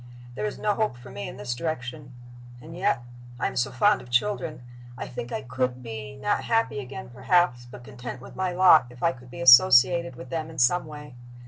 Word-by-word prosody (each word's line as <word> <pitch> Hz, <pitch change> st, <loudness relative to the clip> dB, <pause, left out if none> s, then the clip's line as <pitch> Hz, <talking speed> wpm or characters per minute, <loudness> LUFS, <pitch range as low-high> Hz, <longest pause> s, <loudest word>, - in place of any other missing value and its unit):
There 105 Hz, -2 st, -3 dB
is 105 Hz, -, -6 dB
no 210 Hz, -1 st, 0 dB
hope 215 Hz, -, -1 dB
for 125 Hz, +1 st, -13 dB
me 100 Hz, -, -6 dB
in -, -, -10 dB
this 115 Hz, +4 st, -4 dB
direction. 130 Hz, -2 st, -5 dB, 0.4 s
And 160 Hz, +6 st, -11 dB
yet 180 Hz, -9 st, 0 dB, 0.4 s
I -, -, -1 dB
am -, -, -2 dB
so 125 Hz, -, 0 dB
fond 205 Hz, +11 st, +2 dB
of 125 Hz, -, -14 dB
children! 155 Hz, 0 st, -1 dB, 0.3 s
I -, -, -6 dB
think 120 Hz, 0 st, -7 dB
I -, -, -4 dB
could 125 Hz, 0 st, -3 dB
be, 110 Hz, 0 st, -7 dB
not 205 Hz, +9 st, -1 dB
happy 225 Hz, -11 st, 0 dB
again, 125 Hz, -2 st, -8 dB
perhaps, 125 Hz, -3 st, +1 dB
but 120 Hz, -, -12 dB
content 125 Hz, 0 st, -8 dB
with -, -, -13 dB
my 190 Hz, -1 st, -1 dB
lot, 175 Hz, -6 st, +6 dB
if 125 Hz, 0 st, -13 dB
I 170 Hz, -, +4 dB
could 125 Hz, -3 st, -14 dB
be 125 Hz, -, -9 dB
associated 130 Hz, +4 st, +6 dB
with 125 Hz, +1 st, -11 dB
them 160 Hz, -1 st, -3 dB
in 160 Hz, -, -12 dB
some 145 Hz, +8 st, +2 dB
way. 150 Hz, -3 st, -10 dB
130 Hz, 215 wpm, -25 LUFS, 125-170 Hz, 0.4 s, lot